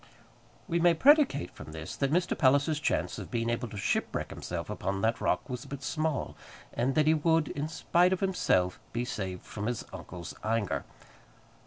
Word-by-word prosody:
We 170 - +1
may 170 0 +5
predicate 280 - +4
from 80 - -10
this 80 0 -6
that 140 -1 0
Mr. 180 +2 +2
Palliser's 140 +3 +3
chance 155 - -1
of - - -7
being 115 -1 0
able 120 +1 -2
to 105 -2 -8
shipwreck 95 - -1
himself - - -5
upon 95 +1 -2
that 115 +1 +1
rock - - +1
was 125 -2 -5
but 140 -1 -7
small, 155 0 -1 0.4
and 130 +3 0
that 155 - +4
he 155 - +5
would, 160 0 +2
in 145 +2 -3
spite 175 +3 +2
of 190 - +1
himself, 95 - +1
be 120 +1 -1
saved 95 -7 -4
from 105 0 -5
his 120 -2 -2
uncle's 85 -2 -7
anger. 110 -10 0
135 Hz, 180 wpm, -30 LUFS, 110-160 Hz, 0.4 s, may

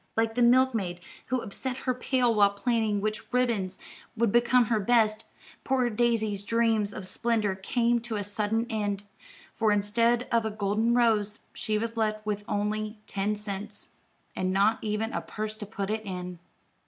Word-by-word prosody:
Like 225 0 +2
the 245 - 0
milk 255 +2 +5
maid 180 -5 -2 0.3
who 255 0 0
upset 250 +5 -3
her 255 - +2
pail 250 -1 +1
while 205 -2 +5
planning 215 -1 0
which 215 +3 -3
ribbons 235 -7 0 0.4
would 230 -2 +2
become 240 +1 +4
her 220 0 +1
best, 220 0 +2 0.4
poor 255 -2 +1
Daisy's 220 -3 +1
dreams 225 -1 +1
of 190 -2 -7
splendor 220 -2 0
came 235 +5 +1
to 230 -1 -5
a 205 - -2
sudden 210 +3 -1
end; 205 -3 -2 0.5
for 220 -2 +2
instead 230 +4 +2
of 230 -1 +3
a 220 - -1
golden 215 +3 +1
rose, 215 -3 +2
she 215 -2 -1
was 230 +1 -3
left 215 -1 -1
with 210 -1 -2
only 210 +1 -2
ten 205 +1 -1
cents, 205 -1 -6 0.4
and 185 0 -1
not 200 +4 +3
even 215 +1 -2
a - - -1
purse 215 0 -5
to 210 -2 -7
put 200 -1 -3
it 220 0 -1
in. 180 -3 -6
215 Hz, 170 wpm, -28 LUFS, 205-235 Hz, 0.5 s, milk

